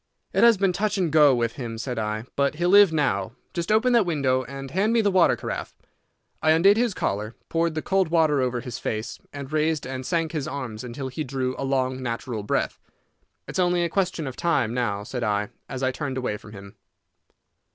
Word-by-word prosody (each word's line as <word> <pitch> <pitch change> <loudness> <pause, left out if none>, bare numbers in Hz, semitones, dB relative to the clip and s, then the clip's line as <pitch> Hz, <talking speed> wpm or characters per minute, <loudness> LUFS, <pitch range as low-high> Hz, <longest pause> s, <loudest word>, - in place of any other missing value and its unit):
"It - - +3
has 235 -2 +7
been 190 -1 +2
touch 205 +2 0
and 175 -5 0
go 150 -3 +6
with 115 0 -1
him," 115 -4 -5
said 120 0 -3
I, 110 0 -2
"but 140 +1 +1
he'll 175 +3 0
live 200 -3 +8
now. 115 -10 0 0.2
Just 170 +2 -2
open 235 +4 +3
that 235 -2 +5
window, 135 -7 +1
and 135 +1 -8
hand 205 +7 +1
me 235 - +4
the 205 -2 +2
water 185 -2 +4
carafe." - - -5 0.7
I 155 - +2
undid 195 +6 +5
his 230 -3 +1
collar, 105 +3 -2
poured 165 -1 0
the 155 - -2
cold 190 -2 +2
water 155 -4 +3
over 125 -1 -1
his 125 -3 -6
face, 110 +1 -4
and 140 0 -8
raised 155 -1 +1
and 130 0 -5
sank 165 +2 -1
his 150 -4 -3
arms 125 -6 -5
until 130 +2 -5
he 155 +4 -4
drew 130 -1 -2
a - - -5
long, 130 -1 0
natural 115 -2 -3
breath. 105 - -1 0.7
"It's - - -4
only 175 -1 +2
a 170 - 0
question 180 -3 -1
of 130 -2 -5
time 165 -9 +1
now," 105 -5 -1
said 120 +3 -4
I, 105 -1 0 0.2
as 135 -1 -5
I 130 - +2
turned 130 -1 -4
away 125 -5 -2
from 105 0 -12
him. 100 +1 -12
140 Hz, 215 wpm, -25 LUFS, 125-170 Hz, 0.7 s, live